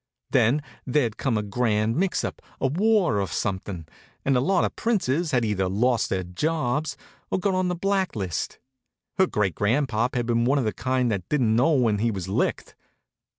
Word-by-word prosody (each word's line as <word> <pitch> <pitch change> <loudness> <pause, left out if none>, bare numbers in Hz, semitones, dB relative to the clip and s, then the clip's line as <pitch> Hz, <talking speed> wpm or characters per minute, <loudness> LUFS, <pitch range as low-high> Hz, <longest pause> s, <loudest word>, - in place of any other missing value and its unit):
Then 140 +7 +3 0.2
there'd 125 -4 0
come 120 -5 0
a 105 - -1
grand 110 +1 0
mix 185 +3 0
up, - - -4 0.2
a - - -1
war 180 - +2
or 95 - -1
something, 95 -4 -3 0.4
and 135 - +3
a - - +4
lot 180 +6 +2
of - - -4
princes 175 - 0
had 125 -5 +1
either 95 -3 0
lost 120 +5 +1
their 95 -1 -1
jobs 140 - -1 0.3
or - - 0
got 195 +1 0
on 185 0 +1
the 180 - -1
blacklist. 180 - -1 0.6
Her 190 - +5
great 100 - 0
grandpop 120 +2 0
had 120 -1 0
been 115 0 +1
one 135 +4 +2
of 135 - +1
the 110 - 0
kind 130 +2 0
that 95 -4 -3
didn't 120 -7 +2
know 130 +8 +4
when 115 -7 +2
he 115 +2 +2
was 95 -4 -4
licked. 95 - -1
125 Hz, 190 wpm, -25 LUFS, 105-150 Hz, 0.6 s, Her